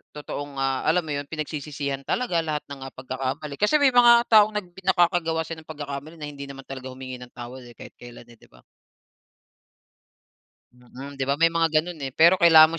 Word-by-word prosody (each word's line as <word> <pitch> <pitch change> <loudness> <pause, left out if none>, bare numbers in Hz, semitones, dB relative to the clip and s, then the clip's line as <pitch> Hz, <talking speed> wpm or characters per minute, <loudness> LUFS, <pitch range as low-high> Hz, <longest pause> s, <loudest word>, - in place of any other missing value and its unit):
totoong, 145 -1 -6
ah, 135 -1 -1
alam 170 +3 +3
mo 155 - -5
'yun 145 - -5
pinagsisisihan 145 -2 -4
talaga 240 -9 0
lahat 150 -1 -2
ng, 140 -1 -8
ah, 135 - -9
pagkakamali. 135 +3 -5
Kasi 210 +8 +3
may 275 - +5
mga 240 -1 +7
taong 215 -1 +6
nag 210 -3 -3 0.2
nakakagawa 175 -3 +2
siya 160 0 -7
ng 160 - -18
pagkakamali 145 +1 -7
na 150 -2 -6
hindi 140 -1 -8
naman 135 0 -10
talaga 130 -1 -8
humingi 130 -1 -8
ng 125 0 -12
tawad 125 +2 -8
eh, 120 - -15
kahit - - -12
kelan 120 -1 -12
eh, 120 - -16
'di - - -20
ba. - - -21 2.1
Mm, 130 +3 -12
'di 135 - 0
ba 140 - +2
may 165 +3 +3
mga 165 0 +2
gano'n, 175 -1 -8
eh, 135 -3 -5
pero 170 +3 +6
kailangan 165 -1 +7
145 Hz, 195 wpm, -24 LUFS, 135-165 Hz, 2.1 s, mga